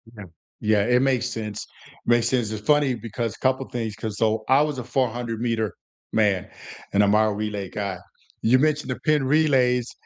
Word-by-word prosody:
Yeah. 105 - -9 0.4
Yeah, 105 -1 +3
it 125 +1 +3
makes 130 -2 +1
sense. 110 -3 -5 0.4
Makes 120 -1 +3
sense. 120 -4 0
It's 105 -1 -6
funny 145 -3 +3
because- 115 -1 -4
a - - -20
couple 130 0 0
things- 115 -4 -4
'cause 110 -1 -5
so 110 -1 +1
I 135 +3 +5
was 150 -3 -1
a 125 - -4
four-hundred-meter 115 -3 -1 0.4
man, 100 -4 +1 0.4
and 100 +1 +4
I'm 100 +1 +3
our 110 -1 +3
relay 105 -2 -3
guy. 100 -3 -4 0.5
You 125 +3 +4
mentioned 150 0 +1
the - - -4
pin 150 -3 +2
relays. 130 -4 +2
115 Hz, 180 wpm, -24 LUFS, 105-130 Hz, 0.5 s, I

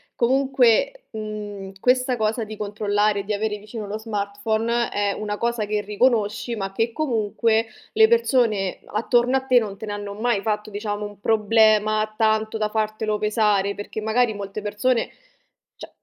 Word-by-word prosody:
comunque, 265 - +2
mhmm, 210 -3 -6
questa 255 +2 +2
cosa 220 +1 0
di 215 0 -8
controllare, 205 0 0
di 210 +2 -3
avere 210 +1 -1
vicino 210 +1 -8
lo 205 +2 -4
smartphone, 220 +2 -1
è 205 -1 0
una 210 0 -4
cosa 235 -1 -1
che 210 0 -1
riconosci 215 +1 0
ma 195 -1 -3
che 225 +4 0
comunque 225 -4 0 0.3
le 440 - +6
persone 240 - +2
attorno 240 +4 +2
a - - -1
te 255 -2 +5
non 205 -4 -5
te 220 - -7
ne 205 - -4
hanno 205 0 -5
mai 220 0 0
fatto 210 0 -2
diciamo 205 0 -3
un 205 -1 -10
problema, 215 0 +3
tanto 220 0 +1
da 215 -1 0
fartelo 215 0 -1
pesare. 210 -2 +1
Perché 205 +1 -6
magari 220 +1 +2
molte 200 0 -6
persone 210 +4 0 0.7
cioè, - - -10
215 Hz, 155 wpm, -23 LUFS, 205-230 Hz, 0.7 s, le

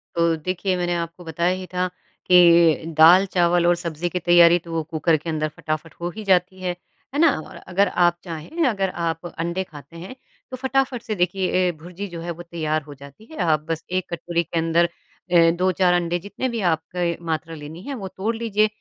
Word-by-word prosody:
तो 170 -1 +2
देखिए 185 +4 -2
मैंने 175 0 -1
आपको 170 +1 -5
बताया 170 +3 0
ही 185 - -7
था 180 0 0 0.4
कि 170 -3 +6
दाल 175 +5 +8
चावल 175 -1 +3
और 175 - +4
सब्ज़ी 170 0 -4
की 180 - -2
तैयारी 175 0 +6
तो 170 0 -12
वो 160 - -1
कुकर 160 +1 +1
के 165 +3 -7
अंदर 155 -1 -1
फटाफट 155 0 -4
हो 175 - -2
ही 215 - -6
जाती 185 -1 +1
है, 180 - -1 0.4
है 285 - -1
ना? 325 -2 +6
और - - -11
अगर 195 +2 0
आप 175 -1 +2
चाहें, 175 - -3
अगर 195 -5 0
आप 165 -1 -3
अंडे 170 +3 -2
खाते 165 -1 -13
हैं 185 +9 -9 0.4
तो 255 - -5
फटाफट 265 -1 0
से 220 -2 -4
देखिए 180 +1 0 0.2
ए, - - +1
भुरजी 175 +5 -8
जो 170 -3 -8
है 170 +1 -4
वो 175 +1 -8
तैयार 155 -2 -2
हो 145 0 -11
जाती 140 +8 -14
है। 315 - -10
आप 155 -3 +2
बस 165 0 -2
एक 185 0 0
कटोरी 170 0 -1
के 170 - -5
अंदर 165 +1 +3 0.5
अ, 165 -1 +6
2-4 180 +1 +2
अंडे, 175 0 0
जितने 205 +8 -4
भी 235 - -3
आपके 170 +1 -3
मात्रा 165 0 -3
लेनी 155 +3 -9
है, 280 - -5
वो 200 -6 -6
तोड़ 210 +5 -3
लीजिए। 215 -2 +1
175 Hz, 210 wpm, -22 LUFS, 165-185 Hz, 0.5 s, दाल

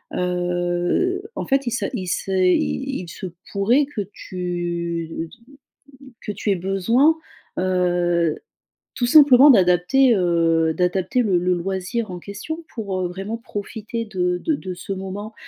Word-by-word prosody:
heu, 180 - 0
en - - -3
fait 275 -1 +2
il - - 0
se 225 -3 -1
il 185 - -4
se, 190 +2 -2
heu - - +1
il 75 - 0
il 175 - -9
se 190 - -8 0.3
pourrait 230 +9 +3
que 255 -8 -4
tu 170 -2 -4 1.0
que - - -5
tu 205 +1 -2
aies 195 - +2
besoin, 225 - +2 0.4
heu, 175 -3 +1 0.6
tout 240 - 0
simplement 285 0 +8
d'adapter, 195 +5 +5
heu, 165 -3 +2
d'adapter 185 +6 +1
le 190 -5 +2
le 180 +1 +1
loisir 190 +4 -3
en 180 - -6
question 210 - -7
pour, 200 -5 -3
heu, 180 - 0
vraiment 195 +5 -5
profiter 225 +1 -5
de 180 -3 -1
de 315 - -1
de 185 -10 -5
ce 195 +2 -5
moment 195 +3 -6
185 Hz, 145 wpm, -22 LUFS, 175-225 Hz, 1.0 s, simplement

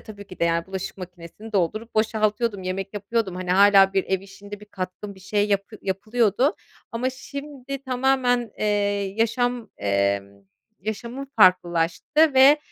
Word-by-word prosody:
tabii 205 -2 -11
ki 185 - -12
de - - +2
yani 170 0 0
bulaşık 190 0 -5
makinesini 180 +4 -10
doldurup 215 +5 -1
boşaltıyordum, 215 -1 0
yemek 195 +2 -4
yapıyordum 205 -1 -2
hani 180 0 -4
hâlâ 195 0 +6
bir 195 -1 +1
ev 190 -1 -1
işinde 200 +1 -11
bir 210 - -13
katkım 190 +1 -6
bir 190 - -17
şey 205 +2 0
yap 200 -1 +1 0.2
yapılıyordu 215 - +1 0.4
ama 250 +3 -1
şimdi 275 0 -8
tamamen, 250 -2 +1
eee, - - -1 0.5
yaşam, 235 0 0
emm, 100 0 -1 0.4
yaşamım 235 +5 -5
farklılaştı 185 - +3
ve, 275 +3 +7
205 Hz, 140 wpm, -24 LUFS, 185-240 Hz, 0.5 s, ve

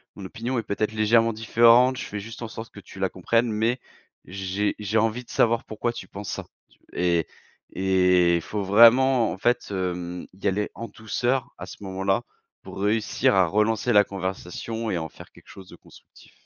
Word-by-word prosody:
Mon 100 - -9
opinion 120 +7 -4
est 115 - -1
peut-être 105 +1 -2
légèrement 115 +1 +3
différente, 115 +3 +4
je - - -5
fais 105 - -6
juste 115 +3 -10
en 115 - -4
sorte 110 +1 -9
que - - -11
tu 95 - -13
la 95 -1 0
comprennes 115 +6 0
mais 115 +4 0 0.4
j'ai 95 +2 -2
j'ai 105 +1 -1
envie 115 +3 0
de - - -25
savoir 115 0 +1
pourquoi 110 +2 -3
tu 120 -5 -9
penses 100 +1 -8
ça, - - -5 0.2
tu» - - -28
et 85 -2 +1 0.5
et 90 -2 +3
faut 105 +5 -4
vraiment 115 +4 +5
en - - -6
fait, 120 +5 0
hem, 90 -2 -4
y 95 - -4
aller 105 +2 0
en 115 - -6
douceur 120 +3 -2
à - - -7
ce - - -11
moment-là, 95 +3 -1 0.4
pour - - -10
réussir 105 +1 +1
à 95 -2 +4
relancer 105 +5 +1
la 105 -2 +6
conversation 100 +4 -5
et 90 - -1
en 80 -1 -5
faire - - -14
quelque - - -20
chose 95 -2 -13
de - - -12
constructif. - - -19
105 Hz, 195 wpm, -24 LUFS, 95-115 Hz, 0.5 s, la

